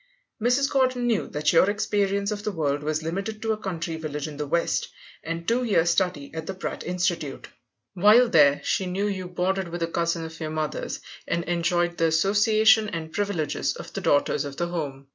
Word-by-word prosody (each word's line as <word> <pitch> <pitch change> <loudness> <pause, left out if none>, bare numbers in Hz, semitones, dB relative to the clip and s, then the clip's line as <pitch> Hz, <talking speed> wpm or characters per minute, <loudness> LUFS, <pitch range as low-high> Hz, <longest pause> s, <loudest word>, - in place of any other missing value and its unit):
Mrs. 250 +4 +3
Gordon 255 -2 +2
knew 230 -4 +1
that 150 +2 0
your 175 +4 +5
experience 200 -1 0
of 210 -1 -3
the 210 - -1
world 145 -5 -1
was 155 +1 -2
limited 195 +7 -3
to 225 - 0
a 215 - 0
country 170 -5 -4
village 150 -2 -4
in 150 -2 -8
the 150 0 -3
West, 170 +4 0 0.4
and 165 +1 -5
two 240 +2 +2
years' 175 -7 +3
study 180 -6 -1
at 160 -1 -6
the 190 - -4
Pratt 190 - -5
Institute. 175 -6 -2 0.4
While 210 +6 +6
there 145 -9 +5
she 185 +6 0
knew 190 +3 -1
you 190 -3 -3
boarded 185 +1 -1
with 170 0 -4
a - - 0
cousin 170 0 -1
of 160 0 -9
your 155 - -3
mother's, 155 -1 -3 0.3
and 170 0 -1
enjoyed 175 0 0
the 165 - +4
association 210 +6 +4
and 160 -4 -6
privileges 200 -7 -1
of - - -9
the - - -4
daughters 145 - +2
of 140 -1 -7
the 175 0 -1
home. 140 -6 -4
175 Hz, 200 wpm, -25 LUFS, 160-205 Hz, 0.4 s, While